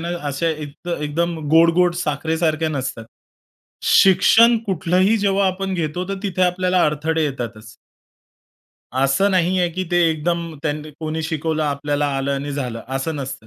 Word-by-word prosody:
ना, 170 - -4 0.2
अशा 145 +4 -1 0.4
एकदम 165 +3 -2
गोड-गोड 170 +2 +4
साखरेसारख्या 160 0 -1
नसतात. 135 -6 -4 0.8
शिक्षण 225 +5 +6
कुठलंही 185 +3 +2
जेव्हा 200 -1 +2
आपण 190 0 -2
घेतो 175 +2 -3
तर 195 - -2
तिथे 185 -2 -1
आपल्याला 180 0 +2
अडथळे 155 +2 0
येतातच. 115 -5 -6 1.2
असं 135 +10 +2
नाहीये 180 -1 +2
की 185 +2 -3
ते 175 - +2
एकदम 165 +1 -2
त्यांनी 150 0 -3
कोणी 160 0 -3
शिकवलं 160 0 -2
आपल्याला 145 0 -1
आलं 135 +1 -1
आणि 145 +1 -4
झालं 125 -5 -4 0.2
असं 155 +4 -3
नसतं. 135 -5 -6
160 Hz, 135 wpm, -20 LUFS, 145-180 Hz, 1.2 s, शिक्षण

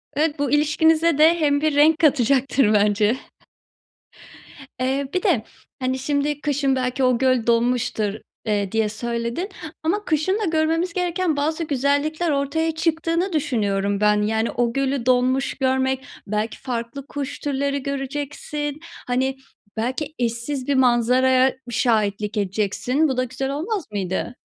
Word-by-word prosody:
Evet, 300 +1 0
bu 285 - 0
ilişkinize 310 +2 +3
de 325 +3 +5
hem 285 -2 +2
bir 310 -2 +1
renk 310 +2 +5
katacaktır 270 -5 +3
bence. 210 +3 +3 1.6
Eee, 265 +2 0
bir 365 - 0
de 305 - +2 0.4
hani 260 0 -1
“şimdi, 290 +1 -1
kışın 280 -2 +1
belki 255 +1 -1
o 255 -2 +3
göl 255 -3 +1
donmuştur“, 235 -3 +1 0.3
eee, 205 -3 0
diye 220 -1 +1
söyledin, 235 - -3 0.3
ama 405 +6 0
kışın 320 +6 +1
da 430 - -1
görmemiz 330 +1 0
gereken 360 -2 0
bazı 310 +3 -1
güzellikler 295 +3 0
ortaya 290 +4 0
çıktığını 330 +3 0
düşünüyorum 205 -9 0
ben. 210 0 +3
Yani, 220 +2 0
o 235 -1 0
gölü 275 -2 -1
donmuş 255 +1 +2
görmek, 265 0 0 0.2
belki 215 +2 -2
farklı 250 +2 -5
kuş 285 -2 -5
türleri 280 -1 -1
göreceksin. 290 +2 -4 0.3
Hani, 260 +2 0 0.4
belki 260 +7 -2
eşsiz 240 +3 -2
bir 280 - +2
manzaraya 255 +1 +3
şahitlik 215 -3 0
edeceksin. 210 +9 0
Bu 265 -3 -2
da 255 - +2
güzel 265 +2 -4
olmaz 345 +7 -3
mıydı? 195 +4 -3
270 Hz, 135 wpm, -22 LUFS, 235-300 Hz, 1.6 s, de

